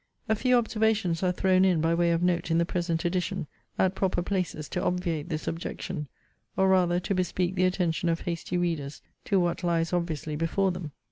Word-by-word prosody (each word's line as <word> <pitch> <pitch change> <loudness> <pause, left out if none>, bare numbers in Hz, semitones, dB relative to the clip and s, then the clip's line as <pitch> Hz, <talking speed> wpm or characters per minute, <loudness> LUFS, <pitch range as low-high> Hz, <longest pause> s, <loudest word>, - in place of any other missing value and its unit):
A 220 - +2
few 250 +3 +3
observations 220 -7 +1
are 185 -1 +2
thrown 185 0 +3
in 185 -4 +3
by 165 +1 +2
way 170 0 +2
of 170 +1 +1
note 175 -2 +1
in 165 - +2
the 170 - +3
present 170 -2 -1
edition, 175 -2 -1 0.3
at 190 0 +2
proper 190 -2 0
places 180 -5 -2
to 180 - -2
obviate 175 -4 -1
this 155 -1 -4
objection, 165 -1 -4 0.5
or 190 0 +4
rather 180 -2 +3
to 185 - -2
bespeak 185 0 0
the 185 0 +2
attention 175 -2 0
of 165 0 0
hasty 175 +1 -3
readers 160 -5 -2 0.2
to 195 - +2
what 175 0 0
lies 165 -1 +1
obviously 160 -3 -2
before 175 +5 +1
them. 175 -4 -6
175 Hz, 195 wpm, -28 LUFS, 165-185 Hz, 0.5 s, or